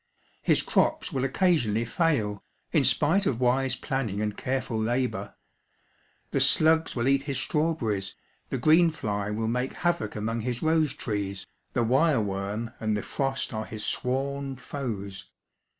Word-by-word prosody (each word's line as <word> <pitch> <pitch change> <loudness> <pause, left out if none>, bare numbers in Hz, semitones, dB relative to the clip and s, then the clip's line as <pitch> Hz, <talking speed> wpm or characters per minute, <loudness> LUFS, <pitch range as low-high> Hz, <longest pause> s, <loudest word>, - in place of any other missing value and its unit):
His - - +3
crops - - +1
will 130 - 0
occasionally 135 - +2
fail, 115 - 0 0.3
in - - +3
spite 180 +7 +3
of 120 - 0
wise 130 +1 +2
planning 120 -5 -2
and 105 -1 -1
careful 130 -4 -2
labour. 115 -4 -1 1.0
The - - +1
slugs 160 +1 +4
will 120 0 0
eat 135 0 +4
his 135 - -1
strawberries, 125 - -1 0.3
the 135 - -1
green 160 +6 +5
fly 105 -10 -3
will 110 +1 -2
make 125 +3 -1
havoc 170 -12 -1
among 115 +2 -2
his 125 +3 -3
rose 160 -3 +2
trees, 100 -3 -3 0.3
the 120 - +2
wire 135 +4 +3
worm 105 +2 -3
and 110 -1 0
the 105 - -4
frost 135 -2 -2
are 110 0 -3
his 110 -1 -5
sworn 135 +1 -1
foes. 105 -8 -6
125 Hz, 150 wpm, -27 LUFS, 105-140 Hz, 1.0 s, green